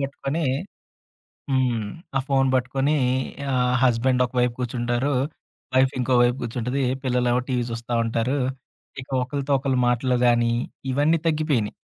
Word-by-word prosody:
బట్టుకొని 140 +3 -3 1.1
హ్మ్. 125 -4 +1 0.3
ఆ - - +2
ఫోన్ 135 -1 +3
బట్టుకుని 135 +4 +1 0.6
ఆహ్, 125 0 +2
హస్బెండ్ 125 +1 +3
ఒకవైపు 125 -1 0
కూర్చుంటారు. 120 +2 -1 0.6
వైఫ్ 130 0 +4
ఇంకో 125 +1 +1
వైపు 120 +2 +2
కూర్చుంటది. 125 +3 -2 0.2
పిల్లలు 125 -1 +1
ఏమో 125 - +2
టీవీ 125 -2 +1
జూస్తా 115 +1 -5
ఉంటారు. 115 +5 0 0.6
ఇక 130 - -13
ఒకళ్ళతో 140 +2 -3
ఒకళ్ళు 130 -2 0
మాటలు 125 +1 +1
గానీ 120 -1 +3 0.4
ఇవన్నీ 145 +5 +3
తగ్గిపోయినయి. 150 -9 0
125 Hz, 125 wpm, -24 LUFS, 120-135 Hz, 1.1 s, వైఫ్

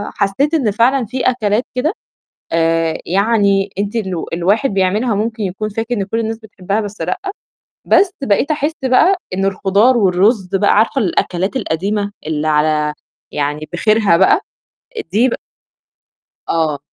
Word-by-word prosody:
حسّيت 210 +10 0
إن 255 -10 +2
فعلًا 240 +4 +2
في 255 +4 -5
أكلات 225 -2 0
كده 300 +8 0 0.6
آآ، 165 0 +1
يعني 200 0 +2
أنتِ 205 +3 -2
الو 190 -7 -3
الواحد 195 +10 +1
بيعملها 200 +5 +1
وممكن 220 +2 -2
يكون 200 +3 -3
فاكر 225 +3 -3
إن 200 - -1
كل 225 +4 -3
الناس 225 0 -2
بتحبّها 205 -1 -3
بس 210 0 -7
لأ. 375 - -2 0.7
بس 390 -2 +4
بقيت 260 +4 +1
أحِس 300 0 0
بقى 260 +9 +4 0.2
إن 195 +1 -1
الخُضار 200 +5 +2
والرُز 195 0 +2
بقى 205 +1 +3
عارفة 230 +5 +2
الأكلات 190 +2 -1
القديمة 200 +2 -1 0.2
اللي 155 0 -1
على 150 0 +1 0.4
يعني 150 +1 -2
بخيرها 210 0 +3
بقى 190 +2 +4 0.6
آآ، - - -2
دي 230 +6 +3
بق - - -2 1.1
آه. 155 -3 0
205 Hz, 145 wpm, -17 LUFS, 180-230 Hz, 1.1 s, بس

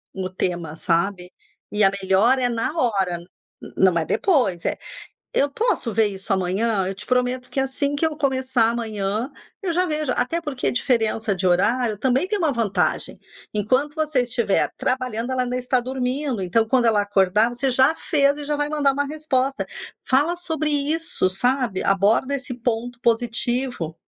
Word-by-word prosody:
o 185 -1 -3
tema, 175 -4 -3
sabe? 180 +2 -1 0.4
E 210 0 +2
a 195 - +5
melhora 205 +8 +3
é 245 - +3
na 230 +2 -1
hora, 195 - +1
n 170 - -13 0.5
não 185 -3 +4
é 160 - -2
depois. 245 - +1
Eh, - - -1 0.6
"Eu 285 - +2
posso 280 - -1
ver 220 -1 +3
isso 195 0 -3
amanhã? 190 +2 0
Eu 195 - -4
te 210 +2 -4
prometo 250 0 0
que 270 - -1
assim 275 +2 -1
que 305 +3 0
eu 310 -1 -6
começar 260 -5 +1
amanhã, 220 +1 -2 0.3
eu 370 - -1
já 365 +2 +2
vejo". 305 -4 -1
Até 330 +8 -1
porque 285 -5 -3
a - - +2
diferença 225 -5 0
de 185 - -3
horário 215 +5 +2
também 260 - +1
tem 415 +1 -1
uma 320 -5 +2
vantagem. 205 -6 -1 0.3
Enquanto 255 +8 0
você 305 -5 +1
estiver 235 -4 0
trabalhando, 255 -1 -2
ela 255 -1 +1
ainda 250 0 -2
está 250 0 +1
dormindo. 255 -1 -2
Então, 220 +5 +1
quando 250 -1 +2
ela 215 -2 +3
acordar, 205 +2 +2
você 245 +3 -1
já 260 +4 +4
fez 285 -2 +2
e 295 - -5
já 295 0 -1
vai 290 0 -1
mandar 285 -3 +2
uma 285 +1 -1
resposta. 275 -3 -1 0.4
Fala 295 +7 +2
sobre 320 -3 -2
isso, 290 - +1
sabe? 245 0 0
Aborda 205 +8 +2
esse 255 -1 -5
ponto 240 0 -3
positivo. 240 -6 0
245 Hz, 175 wpm, -22 LUFS, 205-275 Hz, 0.6 s, a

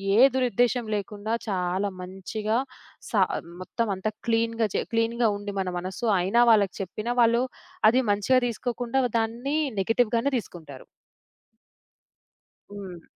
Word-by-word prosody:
ఏ - - +4 0.2
దురుద్దేశం 245 -1 +1
లేకుండా 205 +2 -4
చాలా 190 0 -1
మంచిగా 210 +4 -3 0.5
సా - - +2 0.4
మొత్తమంతా 205 0 -2 0.2
క్లీన్‌గా 230 0 +1
చె - - +1
క్లీన్‌గా 230 +1 +1
ఉండి 205 0 -6
మన 185 -1 -1
మనసు, 190 +6 -5
అయినా 195 +7 +3
వాళ్ళకి 200 -4 +3
చెప్పినా 215 +5 -3
వాళ్ళు 235 +1 +4 0.5
అది 255 +3 +3
మంచిగా 210 +6 +3
దీసుకోకుండా 245 +2 -2
వ 245 - 0
దాన్నీ 240 +7 -2 0.2
నెగిటివ్‌గానే 230 +5 +1
దీసుకుంటారు. 160 - -9 1.9
హ్మ్. 190 -5 -8
220 Hz, 115 wpm, -26 LUFS, 195-235 Hz, 1.9 s, ఏ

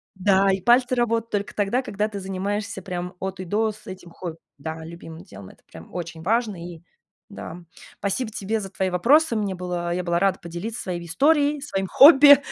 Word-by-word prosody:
Да, 195 +1 +3
и 190 - -1
пальцы 245 +4 +4
работают 230 -1 0
только 205 -1 -3
тогда, 210 +5 +1
когда 210 -4 -2
ты 205 - -6
занимаешься 195 +2 -4
прям 180 -1 -5
от 190 0 -5
и 185 - -5
до 215 +4 0
с 215 +1 -16
этим 185 -2 -10
хобби. 165 -2 -7 0.2
Да, 160 +2 -6
любимым 165 0 -10
делом. 95 -1 -12
Это - - -20
прям 80 0 -13
очень 165 -2 -6
важно. 215 +1 0 0.2
И 165 - -14 0.5
да. 175 -3 -9 0.4
Спасибо 205 +4 -2
тебе 215 +2 -2
за 195 - -6
твои 190 0 -2
вопросы. 240 - +3
Мне 205 -3 -1
было 175 -1 -3
Я 180 0 -2
была 170 0 0
рада 195 +1 +1
поделиться 175 +8 -6
своей 175 -2 -5
историей, 290 - +2
своим 195 -9 -3
хобби, 285 - +9
195 Hz, 190 wpm, -23 LUFS, 175-225 Hz, 0.5 s, хобби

